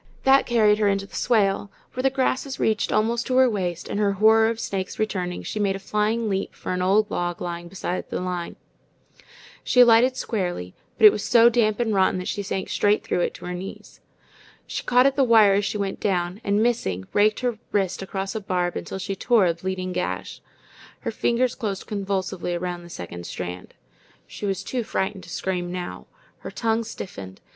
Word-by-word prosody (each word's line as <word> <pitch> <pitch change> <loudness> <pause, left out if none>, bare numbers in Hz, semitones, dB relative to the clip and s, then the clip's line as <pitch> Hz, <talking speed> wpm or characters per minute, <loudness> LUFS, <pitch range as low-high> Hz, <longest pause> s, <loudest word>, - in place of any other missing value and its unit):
That 270 +1 +5
carried 215 -3 +4
her 210 - +3
into 195 0 +1
the - - -20
swale, 205 -4 +1 0.2
where 255 - -2
the 270 - +3
grasses 265 0 -1
reached 215 -2 +1
almost 230 +2 +1
to 255 - +1
her 260 0 +6
waist, 180 -6 -2
and 205 - -3
her 200 -1 +2
horror 220 +2 +5
of 230 0 -3
snakes 190 -4 -4
returning, 185 -5 -2
she 215 - -4
made 200 -2 +1
a - - -3
flying 215 +3 -1
leap 195 -1 -2
for - - -4
an 180 - -1
old 205 +3 +2
log 175 -1 -2
lying 175 -1 -5
beside 185 0 -4
the - - -3
line. 180 -1 -4 1.1
She 250 - +2
alighted 245 +2 +6
squarely, 175 - -3 0.2
but 220 - +5
it 210 - +11
was 210 - -4
so 235 0 +6
damp 225 -2 +1
and 225 -3 0
rotten 190 -1 +3
that 180 - -5
she 205 - -2
sank 190 -1 -4
straight 205 +1 +2
through - - -1
it - - -1
to - - -10
her 180 - -4
knees. 185 +2 -9 0.6
She - - -4
caught 250 +1 +4
at 275 0 +3
the 275 - +3
wire 220 -5 +6
as 200 +1 +1
she 210 - -2
went 200 -1 -3
down, 180 0 -1
and 205 +2 +2
missing, 95 - -1
raked 210 +2 +3
her 245 -4 -1
wrist 195 -3 0
across 195 0 -4
a 220 - -4
barb 180 -2 -1
until - - -5
she 195 +1 -4
tore 220 +1 +3
a 170 - +2
bleeding 185 +1 -4
gash. - - -4 0.6
Her - - -3
fingers 245 +1 +1
closed 205 -6 -4
convulsively 190 -3 -2
around 175 0 -4
the 175 - -13
second 85 - -7
strand. 90 0 -7 0.5
She 205 - -6
was 195 -1 -2
too 250 -2 -2
frightened 190 -2 -3
to - - -13
scream 175 0 -3
now. 180 -1 -6 0.3
Her - - -7
tongue 225 0 0
stiffened. 100 - -8
200 Hz, 205 wpm, -24 LUFS, 180-225 Hz, 1.1 s, it